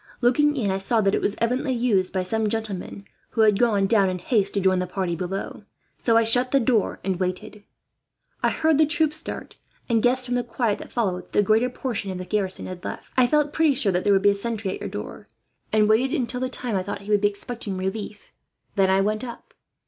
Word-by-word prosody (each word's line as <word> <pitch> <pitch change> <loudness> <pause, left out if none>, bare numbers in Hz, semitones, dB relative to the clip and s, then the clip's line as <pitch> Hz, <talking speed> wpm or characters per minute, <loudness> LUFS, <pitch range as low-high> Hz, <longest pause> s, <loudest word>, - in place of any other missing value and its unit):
Looking 295 +5 +3
in, 210 -6 0
I 190 - -1
saw 225 +4 +1
that 195 -1 +2
it - - +1
was 205 - 0
evidently 250 +3 0
used 215 -6 +1
by 185 -1 -1
some 220 +3 -1
gentlemen 205 -3 -4 0.3
who - - +5
had 210 -2 +4
gone 210 -5 +3
down, 195 -2 +3
in 185 - -2
haste, 200 +1 0
to - - +2
join 190 -1 +2
the 180 - -2
party 180 -1 -2
below; 185 +3 -5 0.3
so 230 -1 +2
I 230 - +5
shut 245 +3 +2
the 275 - +3
door 230 -3 +1
and 190 -2 -1
waited. 200 +3 -4 0.8
I - - +3
heard 315 -2 +2
the 310 - +5
troops 310 -1 +1
start 320 - -6 0.3
and 230 -2 +2
guessed, 250 +2 +2
from 245 - -2
the 245 0 +1
quiet 235 -2 -1
that - - -10
followed, 185 -6 -1
that - - -30
the 205 - +4
greater 220 +5 +3
portion 245 -5 -4
of 185 - -4
the 185 - -6
garrison 195 -2 -2
had 180 -1 -8
left. - - -7
"I 255 -1 +5
felt 295 +1 +1
pretty 315 -4 +3
sure 235 -7 +1
that 180 0 0
there 205 - +4
would 195 - +2
be 205 - +6
a - - +1
sentry 215 -1 -2
at - - -5
your - - -5
door, - - -7 0.4
and 215 -1 +4
waited 245 +7 +2
until 250 0 -2
the 255 0 -1
time 245 -4 -4
I 190 - +1
thought 200 +1 -5
he 205 +1 -6
would 205 -1 +3
be 205 - +4
expecting 205 0 -5
a - - -5
relief. 200 +2 -5 0.4
Then 195 -2 +3
I 190 +1 +4
went 215 +3 -1
up. 240 -2 -9
215 Hz, 245 wpm, -24 LUFS, 195-245 Hz, 0.8 s, be